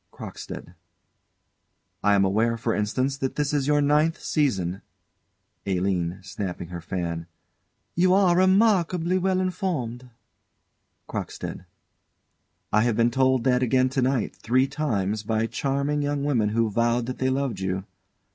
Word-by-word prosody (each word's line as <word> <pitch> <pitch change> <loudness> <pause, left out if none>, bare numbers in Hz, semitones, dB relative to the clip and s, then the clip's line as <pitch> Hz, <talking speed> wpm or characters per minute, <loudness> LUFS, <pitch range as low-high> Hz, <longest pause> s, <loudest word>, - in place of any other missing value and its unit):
CROCKSTEAD. 85 - -8 1.3
I 105 0 +4
am 100 -1 +4
aware, 110 +4 +1
for 115 0 -1
instance, 130 +6 -1
that 135 -2 -3
this 150 -1 -1
is 145 -2 +1
your 145 0 +3
ninth 150 +3 +2
season 95 - 0 0.9
ALINE. 90 -1 -1
[Snapping 90 -2 -5
her 85 -1 -6
fan.] 85 -1 -4 0.7
You 180 +2 +3
are 190 -3 +4
remarkably 185 -2 +3
well 185 0 +1
informed. 160 - -3 1.0
CROCKSTEAD. - - -5 1.1
I 105 - +5
have 115 -1 +1
been 115 0 +3
told 130 -1 +2
that 125 -1 +2
again 130 +1 +3
to 135 0 -1
night, 130 -3 0
three 130 +3 +2
times, 110 -9 -1
by 110 +1 0
charming 140 +4 -1
young 145 -1 -1
women 120 -8 +1
who 110 0 +1
vowed 115 +2 +1
that 130 +1 -5
they 130 - +1
loved 130 -6 -1
you. 95 0 -2
125 Hz, 135 wpm, -25 LUFS, 105-145 Hz, 1.3 s, I